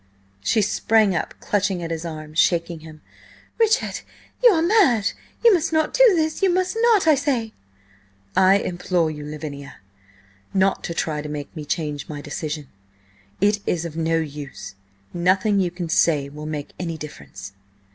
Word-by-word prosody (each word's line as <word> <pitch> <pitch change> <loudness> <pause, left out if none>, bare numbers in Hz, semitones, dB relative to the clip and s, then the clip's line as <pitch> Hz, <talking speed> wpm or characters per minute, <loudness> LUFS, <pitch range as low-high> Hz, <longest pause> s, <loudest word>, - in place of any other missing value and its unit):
She 215 - +2
sprang 210 -1 +2
up, 160 - -3
clutching 195 -3 -1
at 165 - -4
his 165 +1 -4
arm, 155 -2 -7
shaking 170 0 +1
him. 155 -1 -13 0.6
"Richard, 450 +1 +2 0.4
you - - +9
are 330 -7 +3
mad! 330 - +4 0.3
You 460 - +8
must 335 -3 +1
not 315 -1 +1
do - - +5
this! 315 +1 0
You 385 -2 +4
must 370 +3 0
not, 460 -6 +4
I 315 - +6
say!" 265 -6 -1 0.8
"I 190 +1 +6
implore 175 -3 -1
you, 150 -1 -7
Lavinia, 145 -2 -7 0.8
not 195 0 +2
to 170 - -4
try 155 -2 -1
to 150 - -7
make 150 +1 -6
me 155 -2 -6
change 150 -2 -3
my 150 -1 -5
decision. 150 -1 -5 0.7
It 205 +1 +3
is 170 -1 0
of 160 -2 -6
no 165 0 +1
use. 145 -7 -6 0.4
Nothing 185 +4 +2
you 185 -2 +1
can 175 0 -5
say 150 -3 +2
will 150 +2 -8
make 150 -2 -5
any 165 -3 -3
difference." 150 -9 -10
175 Hz, 165 wpm, -22 LUFS, 155-220 Hz, 0.8 s, you